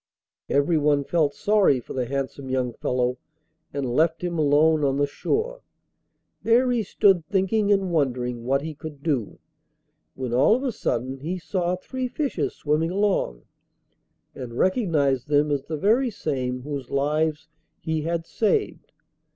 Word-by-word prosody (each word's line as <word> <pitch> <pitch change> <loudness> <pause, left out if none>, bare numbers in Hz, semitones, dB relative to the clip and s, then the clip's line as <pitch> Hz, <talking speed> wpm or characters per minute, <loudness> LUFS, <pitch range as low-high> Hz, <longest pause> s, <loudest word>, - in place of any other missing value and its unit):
Everyone 145 -1 +2
felt 150 -1 +1
sorry 205 -10 +3
for 120 - -9
the 125 -2 -2
handsome 135 0 -4
young 130 -2 -1
fellow 125 +1 -1 0.5
and 140 -1 -3
left 160 +7 +1
him 170 -2 -2
alone 150 +1 +4
on 135 -1 +1
the 145 - +3
shore. 455 - -2 0.8
There 245 +2 +3
he 240 -2 +1
stood 195 -3 +3
thinking 200 +2 +1
and 195 -3 +2
wondering 125 -6 -1
what 135 +3 +1
he 160 0 -5
could 150 -1 -10
do, 135 -10 -1 0.8
when 130 -2 -4
all 135 - +5
of 255 - -3
a 265 - 0
sudden 130 - -2
he 170 +7 -3
saw 175 +2 -1
three 255 +7 -4
fishes 285 +2 -2
swimming 155 +2 0
along, 190 - 0 0.9
and 120 -2 -8
recognised 155 - +1
them 150 0 +2
as 140 -1 -1
the 155 - -4
very 230 - +3
same 130 - -3
whose 140 -3 -5
lives 150 +2 0 0.3
he 160 -1 -2
had 165 +1 -2
saved. 320 - -1
150 Hz, 150 wpm, -24 LUFS, 135-185 Hz, 0.9 s, all